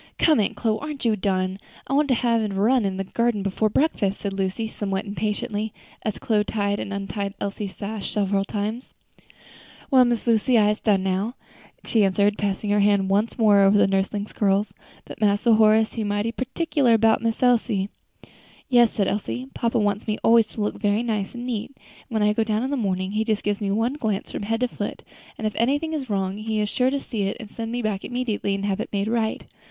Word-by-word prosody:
"Come, 310 -6 +4
Aunt 205 - 0
Chloe, 220 -2 0
aren't 295 -3 -5
you 225 -2 +3
done? 185 -1 -1 0.3
I - - -4
want 290 +1 +3
to 260 - +3
have 230 -1 +1
a 210 -2 -2
run 225 +4 +3
in 190 -1 -2
the 195 - -1
garden 230 +1 0
before 200 +2 0
breakfast," 210 -6 0
said 200 -1 -3
Lucy, 195 +3 -2
somewhat 200 -2 -3
impatiently, 210 +1 -3 0.3
as 215 - -3
Chloe 215 -2 +1
tied 205 -1 -1
and 200 - -5
untied 200 0 -4
Elsie's 200 0 -4
sash 210 0 -5
several 200 -1 0
times. 215 +5 -4 1.0
"Well, 260 -2 +7
Miss 240 -2 0
Lucy, 235 +1 +3
I'se 210 0 +3
done 200 -4 +2
now," 195 +6 -1 0.5
she 220 -3 +2
answered, 200 +2 +2
passing 205 0 -1
her 205 - +3
hand 200 -1 +3
once 210 +4 +1
more 210 -4 +5
over 195 +1 +5
her - - +5
nursling's 195 +2 -1
curls: 200 0 +1 0.3
"but - - -11
Mass 205 0 +2
Horace 220 -1 +4
he 225 - -3
mighty 205 +2 -1
pertickler 255 -1 +1
'bout 225 0 +3
Miss 230 +1 -1
Elsie." 230 -5 +2 0.8
"Yes," 240 -3 +6
said 200 -3 -1
Elsie, 245 +6 -3
"papa 230 -1 0
wants 205 -1 0
me 215 0 0
always 230 -1 +5
to 220 - -6
look 210 - -2
very 205 +1 +1
nice 215 -2 -2
and 240 0 -6
neat; 240 +1 -4
and - - -24
when 220 -3 0
I 210 0 +3
go 225 - +1
down 220 +1 -1
in 265 - -2
the - - +1
morning 190 -5 -1
he 215 +1 0
just 220 -2 -1
gives 205 +1 -1
me 200 - -1
one 225 +6 +1
glance 220 -9 -3
from - - -4
head 225 +3 -2
to 250 - +3
foot, - - -5 0.3
and 220 - -5
if 215 - 0
anything 290 +7 +1
is 275 -5 -4
wrong 195 -1 -1
he 220 0 -2
is 210 -1 0
sure 255 +3 +2
to 280 +1 -1
see 220 -7 -3
it 195 - -3
and 220 -4 -9
send 230 -1 -5
me 240 0 -2
back 205 -3 -2
immediately 225 -5 -2
to 200 - -3
have 200 0 -1
it 225 - -3
made 200 0 -1
right. 225 -1 -1
215 Hz, 220 wpm, -24 LUFS, 200-230 Hz, 1.0 s, Well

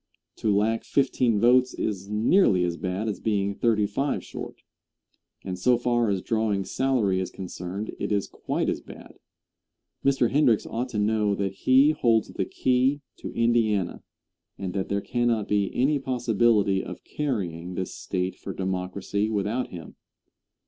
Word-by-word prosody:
To 110 - 0
lack 110 +3 +1
fifteen 125 -5 +1
votes 125 +3 +4
is 100 -2 -3
nearly 105 - +3
as 85 -1 -1
bad 95 +5 -3
as 105 - -2
being 100 -2 0
thirty 105 0 +2
five 135 +8 -1
short, - - -8 0.8
and 90 -1 -5
so 125 +6 +4
far 120 -2 +1
as 95 -2 -1
drawing 110 -4 0
salary 120 -8 +1
is 95 -1 -2
concerned 95 +2 -6
it - - -3
is 100 -1 +1
quite - - -3
as - - -1
bad. - - -13 0.8
Mr. 135 -4 +2
Hendricks 130 -6 +3
ought 125 +3 -3
to 115 - -4
know 105 -1 +2
that 100 -1 -2
he 135 +4 +4
holds 115 -7 +2
the - - -2
key 130 +3 +1 0.2
to - - -7
Indiana, 115 -6 +1 0.6
and 95 -2 -4
that 95 -1 -2
there 100 0 0
cannot 120 -3 0
be 100 -1 +1
any 140 +3 +2
possibility 115 -6 +2
of - - -8
carrying 90 - -3
this 95 - -3
State 90 -1 -3
for 95 - -7
Democracy 95 +3 -2
without 110 +4 -1
him. 85 -3 -10
105 Hz, 155 wpm, -26 LUFS, 95-120 Hz, 0.8 s, votes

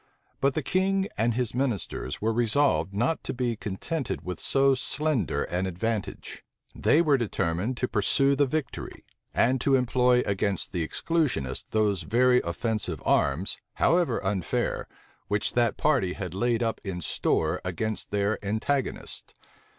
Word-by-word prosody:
But 135 0 +2
the 155 - -1
king 195 +3 +1
and 115 +1 +1
his 125 -2 -1
ministers 125 - -2
were 110 +2 0
resolved 120 0 +2
not 120 +11 0
to - - -4
be 120 -2 -1
contented 120 - -4
with 90 0 -4
so 135 0 +3
slender 130 - 0
an 90 +2 -2
advantage. 105 +3 -4 0.3
They 160 +3 +3
were 145 -4 +3
determined 105 +1 -1
to 125 - 0
pursue 135 +7 +2
the 140 0 +3
victory, 145 -1 -4 0.3
and 130 +1 +2
to 135 +1 +3
employ 125 -1 +3
against 100 -2 -1
the 85 -3 -1
exclusionists 130 - -1
those 105 -4 +1
very 125 +7 +3
offensive 100 -1 -2
arms, 75 +8 +1 0.2
however 165 -8 +2
unfair, 95 -4 -1 0.4
which 105 +1 0
that 120 -1 +2
party 130 -12 +2
had 90 -3 -5
laid 120 +4 +1
up 115 -1 -2
in 95 -3 -4
store - - 0
against 105 +4 -3
their 100 +1 0
antagonists. 110 +7 -2
115 Hz, 145 wpm, -27 LUFS, 100-135 Hz, 0.4 s, so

